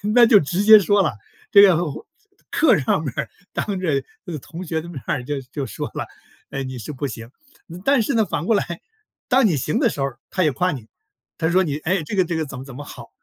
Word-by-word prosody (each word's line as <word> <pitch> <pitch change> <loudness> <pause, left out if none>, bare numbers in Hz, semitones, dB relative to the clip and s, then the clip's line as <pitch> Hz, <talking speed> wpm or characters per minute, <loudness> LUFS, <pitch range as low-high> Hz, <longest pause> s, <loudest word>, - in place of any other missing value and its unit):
那 240 -1 +8
就 220 -2 +7
直 175 +5 -1
接 215 0 +9
说 205 +2 +3
了， 180 - 0 0.4
这 200 - +9
个 190 -5 +7
或 140 - -9 0.5
课 320 - +4
上 145 +3 0
面 140 - -3
儿 115 - -3 0.2
当 200 -3 -2
着 150 -7 0 0.2
那 180 - -7
个 155 - -4
同 170 +7 -9
学 160 -1 -2
的 165 - -10
面 150 -7 -7
儿 125 - -1
就 145 +2 -3
就 140 -3 -3
说 - - -5
了： - - -3 0.5
“哎， 135 - -3
你 130 -1 -6
是 115 +4 -6
不 140 +1 -3
行。” 115 -1 -8 0.4
呃 170 +2 -8
但 275 -3 +4
是 250 +6 -1
呢， 220 -2 +3
反 170 - -3
过 225 - +3
来， 200 - +1 0.6
当 260 0 +4
你 165 -7 +1
行 220 - -1
的 255 -5 +3
时 145 - -7
候 135 - +1 0.2
他 185 - 0
也 155 - +3
夸 180 +6 0
你， 120 -6 -8 0.5
他 160 - 0
说 185 +2 +3
你： 145 -5 -2
“诶， 180 0 +1
这 180 - -5
个， 190 - +4
这 170 - -3
个 160 -1 -1
怎 135 -1 -8
么 130 - -7
怎 135 -3 -11
么 145 - -7
好。” - - -11
165 Hz, 275 characters per minute, -22 LUFS, 140-200 Hz, 0.6 s, 接